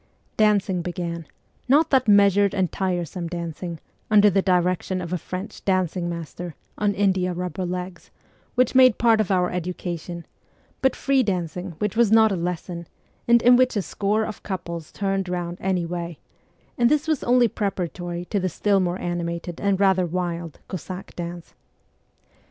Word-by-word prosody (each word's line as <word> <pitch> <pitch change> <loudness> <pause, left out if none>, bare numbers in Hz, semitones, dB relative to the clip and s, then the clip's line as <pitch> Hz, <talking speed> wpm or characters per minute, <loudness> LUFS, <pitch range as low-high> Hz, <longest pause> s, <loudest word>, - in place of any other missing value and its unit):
Dancing 205 -4 +2
began; 170 -2 -4 0.4
not 295 +5 +4
that 260 -3 +3
measured 200 -1 +5
and 185 -3 +1
tiresome 180 -2 -2
dancing, 170 0 -5 0.3
under 210 -1 +6
the 195 +1 +3
direction 185 0 +1
of 175 -1 -5
a - - +1
French 185 +6 -7
dancing 185 -2 0
master 170 0 -6
' - - -41
on 205 -1 +1
india 190 -3 +1
rubber 180 +1 -3
legs,' 180 -1 -6 0.5
which 255 -1 +3
made 255 -3 +6
part 225 -2 +4
of 210 - -2
our 180 -2 +2
education, 175 -1 -5 0.6
but 265 - +2
free 275 -1 +2
dancing 180 -3 -2
which 210 +2 -2
was 230 -2 +3
not 220 -1 +6
a - - +1
lesson, 170 -1 -4 0.4
and 235 -1 +5
in 245 +1 +7
which 255 -1 +3
a 205 - 0
score 210 +4 0
of 215 - -7
couples 170 -4 -5
turned 195 -2 -1
round 175 0 -3
any 185 -2 0
way; 170 -1 -5 0.6
and 240 0 +5
this 300 +2 +1
was 310 -4 0
only 245 0 +4
preparatory 175 -4 -3
to 205 - -1
the 185 0 -1
still 200 +4 +1
more 180 0 -1
animated 170 0 -4
and 200 -1 +1
rather 190 -2 +3
wild 170 -2 -3
Cossack 185 +1 -7
dance. 175 -1 -7
185 Hz, 165 wpm, -24 LUFS, 175-205 Hz, 0.6 s, in